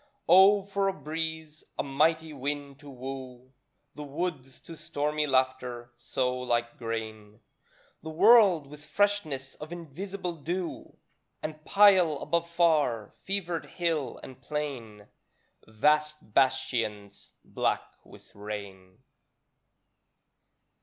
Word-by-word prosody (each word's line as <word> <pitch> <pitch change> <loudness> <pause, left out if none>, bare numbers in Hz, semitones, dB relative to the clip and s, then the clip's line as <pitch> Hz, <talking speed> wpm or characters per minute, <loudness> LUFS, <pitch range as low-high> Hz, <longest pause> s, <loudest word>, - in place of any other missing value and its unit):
Oh, 195 +3 +7
for 200 0 -1
a 195 - +1
breeze, 160 0 -5
a - - 0
mighty 155 +3 +1
wind 140 0 -4
to 145 -1 -12
woo 130 -1 -8 0.4
The - - -9
woods 140 -3 -4
to 165 - -10
stormy 150 0 -2
laughter; 130 -2 -1
sow 125 +1 -2
like 120 -1 -1
grain 110 -2 -5 0.6
The 160 - -7
world 185 -2 +6
with 150 +1 -12
freshness 155 -6 0
of 155 +2 -10
invisible 175 +3 -5
dew. 175 +4 -5 0.5
And 155 0 -6
pile 195 -5 +6
above 170 +3 -1
far, 150 - +2
fevered 175 -4 -2
hill 165 -6 -2
and 130 - -11
plain. 125 -9 -5 0.6
Vast 150 +2 +1
bastions 115 -6 0
black - - 0 0.2
with - - -17
rain. 100 -3 -8
145 Hz, 105 wpm, -28 LUFS, 125-165 Hz, 0.6 s, Oh